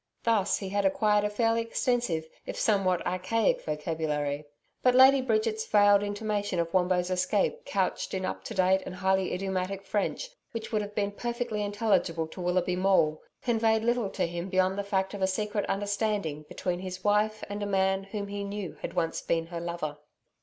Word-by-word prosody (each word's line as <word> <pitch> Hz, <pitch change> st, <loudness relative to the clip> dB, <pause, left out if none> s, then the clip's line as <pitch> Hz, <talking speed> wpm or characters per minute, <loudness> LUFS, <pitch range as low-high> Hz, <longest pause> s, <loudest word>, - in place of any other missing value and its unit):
Thus 220 Hz, -4 st, +2 dB
he 195 Hz, -, -5 dB
had 200 Hz, +1 st, 0 dB
acquired 210 Hz, +2 st, +3 dB
a 210 Hz, -, +1 dB
fairly 225 Hz, +2 st, +1 dB
extensive 230 Hz, -8 st, 0 dB, 0.2 s
if -, -, -5 dB
somewhat 190 Hz, -4 st, +2 dB
archaic 185 Hz, +5 st, +1 dB
vocabulary. 150 Hz, -2 st, -2 dB, 0.4 s
But 250 Hz, -1 st, +4 dB
Lady 265 Hz, +1 st, +7 dB
Bridget's 435 Hz, -, 0 dB
veiled 205 Hz, -, +5 dB
intimation 205 Hz, -1 st, -2 dB
of 170 Hz, -1 st, -1 dB
Wombo's 180 Hz, -1 st, +2 dB
escape 185 Hz, +2 st, 0 dB
couched 190 Hz, 0 st, -1 dB
in 190 Hz, 0 st, -2 dB
up -, -, -4 dB
to 225 Hz, -, -6 dB
date 190 Hz, 0 st, +3 dB
and 185 Hz, -, -6 dB
highly 190 Hz, 0 st, +1 dB
idiomatic 190 Hz, +1 st, -2 dB
French 215 Hz, -, -1 dB, 0.2 s
which 225 Hz, 0 st, -5 dB
would 215 Hz, -2 st, +1 dB
have 205 Hz, 0 st, -7 dB
been 200 Hz, -1 st, 0 dB
perfectly 235 Hz, 0 st, -3 dB
intelligible 200 Hz, -6 st, +1 dB
to 180 Hz, -, -8 dB
Willoughby 180 Hz, 0 st, +1 dB
Maule, 185 Hz, -5 st, +2 dB, 0.2 s
conveyed 225 Hz, -2 st, +2 dB
little 235 Hz, -3 st, +1 dB
to 195 Hz, -, -1 dB
him 170 Hz, +2 st, -4 dB
beyond 185 Hz, 0 st, +2 dB
the -, -, -1 dB
fact 190 Hz, -1 st, -1 dB
of 200 Hz, -, -6 dB
a 190 Hz, -, +3 dB
secret 210 Hz, +2 st, -1 dB
understanding 200 Hz, -6 st, -1 dB
between 180 Hz, -1 st, -2 dB
his 185 Hz, 0 st, -6 dB
wife 210 Hz, +1 st, +2 dB
and 205 Hz, +1 st, -5 dB
a 205 Hz, -, -1 dB
man 190 Hz, 0 st, +1 dB
whom 200 Hz, 0 st, -5 dB
he 200 Hz, 0 st, -4 dB
knew 200 Hz, -4 st, -5 dB
had -, -, -5 dB
once 165 Hz, -2 st, 0 dB
been 165 Hz, -1 st, 0 dB
her 170 Hz, 0 st, -6 dB
lover. 170 Hz, -4 st, -4 dB
195 Hz, 180 wpm, -28 LUFS, 180-210 Hz, 0.4 s, Lady